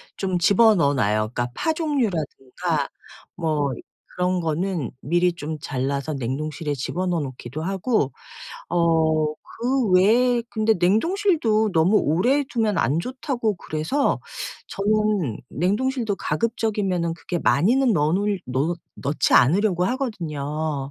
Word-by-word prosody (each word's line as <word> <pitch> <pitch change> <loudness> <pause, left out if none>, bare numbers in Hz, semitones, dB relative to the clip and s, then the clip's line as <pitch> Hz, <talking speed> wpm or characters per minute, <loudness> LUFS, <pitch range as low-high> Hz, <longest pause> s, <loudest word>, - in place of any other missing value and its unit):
좀 185 -2 -1
집어넣어 190 -6 +4
놔요. 105 -5 +2 0.2
그러니까 120 0 -1
파 320 - 0
종류라든가 175 - -2 0.5
뭐 155 -4 0 0.4
그런 180 0 0
거는 165 -2 -1
미리 175 +3 +2
좀 155 -2 -6
잘라서 140 +1 -2
냉동실에 145 +4 -3
집어넣어 175 +6 -2
놓기도 135 0 -6
하고 195 - 0 0.6
어 160 -2 +2 0.3
그 255 -3 +1
외에 235 +6 +4
근데 220 0 +2
냉동실도 220 - +2
너무 170 +6 +4
오래 240 - +2
두면 220 -6 0
안 150 +2 +1
좋다고 250 - -2
그래서 160 - -1 0.5
저는 205 - 0
냉동실도 220 - 0
가급적이면은 195 -3 -1
그렇게 175 +1 -4
많이는 215 - +3
넣어 155 -3 +2
놓을 200 0 0
놓 140 +7 -1 0.2
넣지 140 +2 0
않으려고 180 - +4
하거든요. 155 - -3
180 Hz, 280 characters per minute, -23 LUFS, 150-220 Hz, 0.6 s, 집어넣어